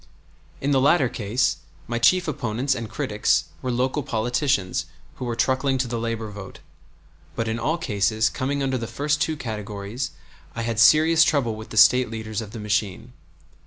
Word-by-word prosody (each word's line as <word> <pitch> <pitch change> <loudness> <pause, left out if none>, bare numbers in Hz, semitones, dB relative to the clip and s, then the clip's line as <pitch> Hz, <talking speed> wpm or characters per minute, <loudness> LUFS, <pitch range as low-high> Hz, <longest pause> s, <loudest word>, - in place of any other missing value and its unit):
In 140 - 0
the 135 -2 +3
latter 140 0 +4
case 120 0 0 0.3
my 120 0 -3
chief 180 +9 +4
opponents 125 -1 -1
and 115 -3 -5
critics - - +1 0.2
were 130 - -3
local 130 +4 0
politicians 120 - 0 0.3
who 130 - -5
were 120 -1 -2
truckling 130 +3 +1
to 130 -1 -1
the 120 -1 -3
labor 115 -2 -3
vote; 100 -2 -9 0.8
but 115 - -2
in 110 +1 -2
all 155 +8 0
cases 110 - +1
coming 140 +4 -2
under 130 -1 -1
the 115 - -4
first 150 +6 -1
two 160 -1 0
categories 105 0 -5 0.5
I 115 - -3
had 115 -1 -2
serious 160 +6 +6
trouble 135 -8 +1
with 110 +1 -9
the 110 - -7
State 125 +3 +6
leaders 110 -1 -4
of 110 - -8
the 115 +2 -8
machine. 105 +2 -2
120 Hz, 175 wpm, -24 LUFS, 110-135 Hz, 0.8 s, serious